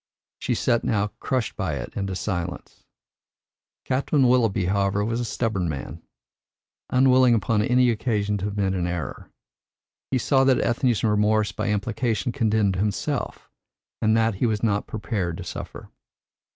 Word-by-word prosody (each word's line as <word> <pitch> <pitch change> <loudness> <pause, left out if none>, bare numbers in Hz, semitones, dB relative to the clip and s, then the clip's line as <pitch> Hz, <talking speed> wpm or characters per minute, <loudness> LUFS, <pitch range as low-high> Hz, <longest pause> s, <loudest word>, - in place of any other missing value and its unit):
She - - -1
sat 115 - +1
now 105 -2 0
crushed 130 -5 -2
by - - -2
it - - -6
into 100 -2 -3
silence. 90 -3 -5 1.0
Captain 135 +1 +2
Willoughby, 115 -7 +2
however, 100 +2 +1
was 115 +1 -1
a - - -1
stubborn 105 -6 -1
man, 75 +2 -6 0.9
unwilling 130 -1 +5
upon 105 0 +1
any 125 +2 +3
occasion 105 -3 -1
to 100 - -2
admit 100 -2 -1
an 90 -2 -1
error. 85 -6 -5 0.8
He 130 - +1
saw 135 +2 +3
that 130 -1 +4
Ethne's 120 -1 +1
remorse 105 0 +2
by - - -3
implication 115 +2 -1
condemned 110 -6 +1
himself, 105 +1 -2 0.5
and 110 0 +3
that 115 0 +2
he 120 - +4
was 110 -1 -1
not 105 -2 +1
prepared 100 -6 -3
to - - -6
suffer. - - -8
105 Hz, 145 wpm, -24 LUFS, 100-120 Hz, 1.0 s, unwilling